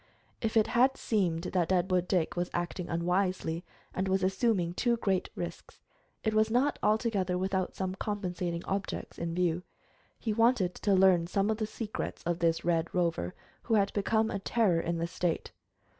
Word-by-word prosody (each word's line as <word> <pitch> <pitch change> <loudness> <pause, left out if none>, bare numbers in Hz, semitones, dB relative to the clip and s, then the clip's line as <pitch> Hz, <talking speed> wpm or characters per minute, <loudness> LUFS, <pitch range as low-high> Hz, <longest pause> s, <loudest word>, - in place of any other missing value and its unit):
If 225 0 0
it 215 - +5
has 250 +3 +4
seemed 175 -7 0
that 180 -2 0
Deadwood 180 -1 +2
Dick 180 -4 +1
was 175 0 -1
acting 175 +1 -3
unwisely, 180 0 0 0.3
and 190 +1 -1
was 190 0 +1
assuming 190 -2 +1
too 235 +5 +1
great 195 -4 0
risks, - - -7 0.4
it 220 - +1
was 215 0 +3
not 255 +6 +2
altogether 210 -4 +1
without 190 0 -1
some 185 -1 -2
compensating 180 -4 -3
objects 195 0 -4
in 170 0 -3
view. 175 -1 +1 0.6
He 220 - -2
wanted 225 -5 +3
to 200 -2 +1
learn 185 -3 +5
some 200 +4 +1
of 215 - -1
the 215 -1 -2
secrets 215 0 -5
of 170 0 -1
this 165 -1 +1
Red 170 -1 +1
Rover 165 - 0 0.3
who 225 - +1
had 200 -1 +2
become 220 +2 +1
a 200 - -2
terror 195 -4 +2
in 170 0 -1
the 165 - -1
State. 170 0 -2
185 Hz, 175 wpm, -30 LUFS, 175-215 Hz, 0.6 s, it